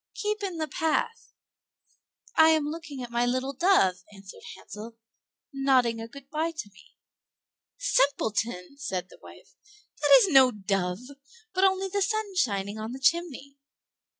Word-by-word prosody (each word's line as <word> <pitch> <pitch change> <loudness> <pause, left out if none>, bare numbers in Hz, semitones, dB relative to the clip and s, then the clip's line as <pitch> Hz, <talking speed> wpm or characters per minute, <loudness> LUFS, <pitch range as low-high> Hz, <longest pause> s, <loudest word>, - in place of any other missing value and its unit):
"Keep 425 0 -2
in 380 -4 -4
the 315 -1 -2 1.7
path."—"I 320 0 +7
am 315 -2 +3
looking 300 -4 -6
at 240 - -8
my 235 0 +1
little 255 +3 -1
dove," 275 - +3
answered 195 -1 -13
Hansel, 225 +2 -10 0.6
"nodding 255 -4 +2
a 225 - -6
good 275 +3 -13
by 315 +2 -1
to 205 -9 -6
me." 180 - -21 0.8
"Simpleton!" 240 - 0
said 185 -9 -4
the - - -16
wife, - - -15 0.5
"that - - +7
is 395 - +1
no 265 -4 +7
dove, 195 -3 -2 0.5
but 375 0 +1
only 380 0 +1
the 400 +1 -2
sun 415 0 -1
shining 205 - -1
on 220 +2 -5
the 265 - -7
chimney." 280 -3 0
270 Hz, 145 wpm, -27 LUFS, 220-335 Hz, 1.7 s, path."—"I